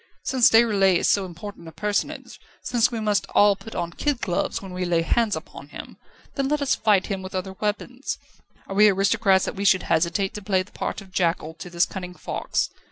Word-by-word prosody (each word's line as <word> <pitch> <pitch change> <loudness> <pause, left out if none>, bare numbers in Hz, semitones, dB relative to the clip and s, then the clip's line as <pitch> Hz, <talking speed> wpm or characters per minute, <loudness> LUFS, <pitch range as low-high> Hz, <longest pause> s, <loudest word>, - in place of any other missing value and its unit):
_ - - -32 0.2
since 255 -3 +4
Déroulède 205 -5 +4
is - - 0
so 195 -2 +2
important 175 0 -9
a - - -8
personage, 205 +3 -3 0.2
since 240 -1 +2
we 230 - -3
must 210 -2 0
all 205 -1 +6
put 225 +3 -11
on 170 - -2
kid 290 - -1
gloves 180 -7 -1
when 190 -2 -9
we 180 0 -3
lay 170 -2 +1
hands 220 +5 +1
upon 140 -3 -9
him, - - -10 0.4
then 275 -2 -1
let 300 +1 +1
us 280 -2 +1
fight 210 -3 +2
him 195 -3 -3
with 185 0 -8
other 190 +1 -3
weapons. 235 +5 -3 0.5
Are - - -7
we 210 +2 +6
aristocrats 195 0 +3
that - - -3
we 200 - -4
should 190 -1 +4
hesitate 170 +4 0
to 210 - -6
play 190 -2 +1
the 195 - -21
part - - -4
of 195 -1 -15
jackal 165 -3 0
to 175 +2 -9
this 175 0 +2
cunning 180 -2 -7
fox? - - -2
195 Hz, 220 wpm, -24 LUFS, 180-215 Hz, 0.5 s, all